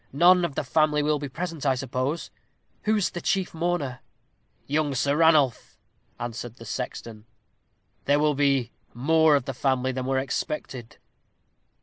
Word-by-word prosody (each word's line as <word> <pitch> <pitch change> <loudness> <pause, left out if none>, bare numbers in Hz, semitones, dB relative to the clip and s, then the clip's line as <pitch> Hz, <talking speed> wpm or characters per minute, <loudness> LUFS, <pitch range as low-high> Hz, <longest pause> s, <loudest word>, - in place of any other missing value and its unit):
"None 175 +5 +5
of 160 -5 -2
the - - -1
family 150 +2 +2
will 150 0 +1
be 145 -1 -5
present, 165 +1 -5
I 135 -2 +2
suppose. 130 +4 -3 0.5
Who 215 +1 +3
is 205 -4 0
the 175 - -6
chief 195 -4 0
mourner?" 165 -6 -2 0.7
"Young 145 -1 0
Sir 140 +3 +1
Ranulph," 155 -6 +3 0.4
answered 120 0 -6
the 115 - -12
sexton. 115 -2 -6 0.8
"There 145 +1 +3
will 150 0 +2
be 135 -4 +1 0.2
more 160 +4 +4
of 140 -3 0
the 135 - -4
family 130 0 0
than 130 0 -4
were 135 0 +1
expected." 130 -2 -4
140 Hz, 150 wpm, -25 LUFS, 130-160 Hz, 0.8 s, None